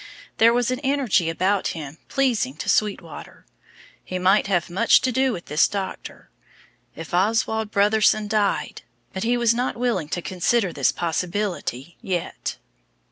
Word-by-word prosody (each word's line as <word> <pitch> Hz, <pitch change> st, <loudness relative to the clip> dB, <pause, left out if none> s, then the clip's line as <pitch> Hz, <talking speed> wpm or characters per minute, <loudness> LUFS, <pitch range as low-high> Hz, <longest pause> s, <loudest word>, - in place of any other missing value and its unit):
There 230 Hz, +1 st, +6 dB
was 245 Hz, +1 st, +1 dB
an 255 Hz, -, -2 dB
energy 265 Hz, -, +1 dB
about 185 Hz, +2 st, 0 dB
him 150 Hz, 0 st, -8 dB
pleasing 240 Hz, -, 0 dB
to 155 Hz, -, -7 dB
Sweetwater. 210 Hz, -2 st, -2 dB, 0.6 s
He 185 Hz, -, -4 dB
might 190 Hz, +3 st, +3 dB
have 180 Hz, -4 st, 0 dB
much 195 Hz, +7 st, +4 dB
to 255 Hz, -, 0 dB
do 260 Hz, +1 st, +1 dB
with 175 Hz, -7 st, -6 dB
this 150 Hz, +1 st, +3 dB
doctor. 195 Hz, -2 st, -6 dB, 0.6 s
If 165 Hz, 0 st, -9 dB
Oswald 220 Hz, +3 st, +1 dB
Brotherson 210 Hz, +1 st, +3 dB
died 205 Hz, -1 st, -1 dB, 0.3 s
but 190 Hz, -, -4 dB
he 240 Hz, +3 st, +1 dB
was 235 Hz, -1 st, +3 dB
not 245 Hz, +1 st, -2 dB
willing 230 Hz, -11 st, -1 dB
to 175 Hz, -, -3 dB
consider 190 Hz, +1 st, 0 dB
this -, -, +2 dB
possibility 175 Hz, -, -3 dB
yet. 185 Hz, -7 st, -4 dB
205 Hz, 145 wpm, -23 LUFS, 175-230 Hz, 0.6 s, There